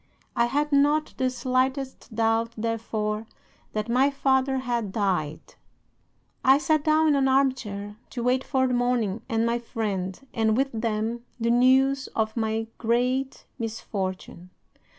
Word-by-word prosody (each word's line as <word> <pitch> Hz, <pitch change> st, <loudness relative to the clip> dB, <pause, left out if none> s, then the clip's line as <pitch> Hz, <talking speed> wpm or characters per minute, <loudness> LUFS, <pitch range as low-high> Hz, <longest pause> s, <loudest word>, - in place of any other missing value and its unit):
I 235 Hz, -, +3 dB
had 290 Hz, +5 st, 0 dB
not 290 Hz, +2 st, +3 dB
the 260 Hz, -1 st, +1 dB
slightest 260 Hz, -1 st, -2 dB
doubt, 225 Hz, 0 st, +1 dB
therefore, 220 Hz, -1 st, -2 dB, 0.5 s
that 215 Hz, 0 st, -2 dB
my 255 Hz, +4 st, +3 dB
father 270 Hz, -1 st, +1 dB
had 240 Hz, -5 st, -2 dB
died. 185 Hz, -8 st, -2 dB, 0.9 s
"'I 265 Hz, +1 st, +6 dB
sat 310 Hz, 0 st, +1 dB
down 310 Hz, +1 st, +4 dB
in 295 Hz, -, +4 dB
an 270 Hz, -1 st, +3 dB
arm 265 Hz, 0 st, +4 dB
chair 205 Hz, -4 st, -7 dB
to 240 Hz, -, -5 dB
wait 255 Hz, +2 st, +2 dB
for 260 Hz, -2 st, +1 dB
the 255 Hz, -, 0 dB
morning 240 Hz, -4 st, 0 dB
and 225 Hz, 0 st, +1 dB
my 235 Hz, +1 st, +1 dB
friend, 200 Hz, -6 st, -3 dB
and, 220 Hz, -1 st, +2 dB
with 270 Hz, +1 st, +1 dB
them, 225 Hz, +1 st, -2 dB, 0.2 s
the 230 Hz, 0 st, +1 dB
news 265 Hz, +3 st, +4 dB
of 220 Hz, -1 st, 0 dB
my 220 Hz, -1 st, -1 dB
great 250 Hz, +3 st, 0 dB
misfortune. 190 Hz, -5 st, -5 dB
235 Hz, 145 wpm, -26 LUFS, 220-265 Hz, 0.9 s, I